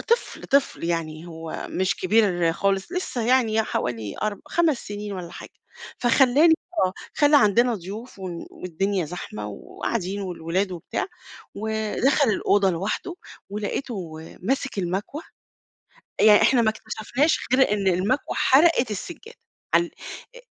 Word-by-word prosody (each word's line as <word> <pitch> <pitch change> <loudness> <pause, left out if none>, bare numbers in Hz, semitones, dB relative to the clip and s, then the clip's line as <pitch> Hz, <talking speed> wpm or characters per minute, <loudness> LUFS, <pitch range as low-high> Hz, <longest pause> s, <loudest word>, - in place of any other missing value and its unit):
طفل، 470 +1 0
طفل 280 -9 +1
يعني، 165 -1 -3
هو 165 -1 -6
مش 185 0 0
كبير 185 -4 +2
خالص، 195 - -1
لسه 255 -10 -2
يعني 235 -3 +3
حوالي 110 - -3
أرب 210 -2 -2
خمس 325 -6 +2
سنين 205 0 -6
والّا 180 -3 -6
حاجة، - - -10 0.5
فخلّاني 270 +6 +5 0.3
آه، 185 - -3 0.2
خلّى 295 0 +5
عندنا 235 +2 +4
ضيوف 205 +5 -8
ون 180 -3 -6
والدنيا 185 +2 -2
زحمة 145 -10 -6
وقاعدين 190 - -4
والولاد 185 +1 -2
وبتاع، 175 - -3 0.5
ودخل 220 +6 +1
الأوضة 200 -1 +2
لوحده، 195 - -3 0.4
ولقيته 205 -3 -4 0.3
ماسك 265 +1 -1
المكوة 195 - -3 1.0
يعني 210 -1 +7
إحنا 250 -3 +4
ما 220 - +3
اكتشفناش 220 +7 -1
غير 260 -5 +4
إن 200 -2 -1
المكوى 190 +9 0
حرقت 270 -4 +4
السجادة، 345 - -7 0.4
عال 170 0 +3 0.5
أ-أ - - -11
205 Hz, 125 wpm, -24 LUFS, 180-250 Hz, 1.0 s, يعني